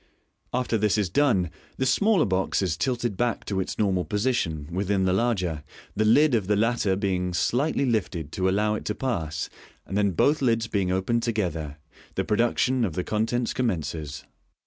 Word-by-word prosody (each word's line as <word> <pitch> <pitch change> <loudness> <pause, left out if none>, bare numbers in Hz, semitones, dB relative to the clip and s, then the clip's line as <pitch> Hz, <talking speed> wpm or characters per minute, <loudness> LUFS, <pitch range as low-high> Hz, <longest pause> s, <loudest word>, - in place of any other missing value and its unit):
After 125 -2 0
this 105 -1 +2
has 100 -5 0
been 145 - +3 0.2
done, 85 - -6 0.3
the 130 - 0
smaller 195 - +3
box 95 0 0
is 90 -4 0
tilted 120 - -1
back 120 +1 -1
to 100 -2 -2
its 95 - -3
normal 95 -4 +1
position 105 - -1
with 95 +2 -2
in 100 -2 +2
the 90 - +2
larger, 95 -8 0 0.3
the 110 - +1
lid 140 +6 +5
of 105 -5 +1
the 105 - +3
latter 110 -2 +1
being 90 -3 -1
slightly 140 - +1
lifted 90 - -1
to 95 0 0
allow 105 +2 +1
it 105 - -4
to 105 - -2
pass, 80 - -2 0.4
and 95 - -5
then 100 -1 +3
both 145 - +2
lids 115 -3 +2
b^ing 100 -4 0
open 95 +6 +1
ed - - 0
together, 85 -10 -2 0.4
the 95 - -1
pro 105 -2 0
duction 120 +2 +2
of 95 -8 -1
the 90 - -2
con 110 +3 0
tents 120 0 -1
commences. 80 - -3
105 Hz, 195 wpm, -26 LUFS, 90-120 Hz, 0.4 s, lid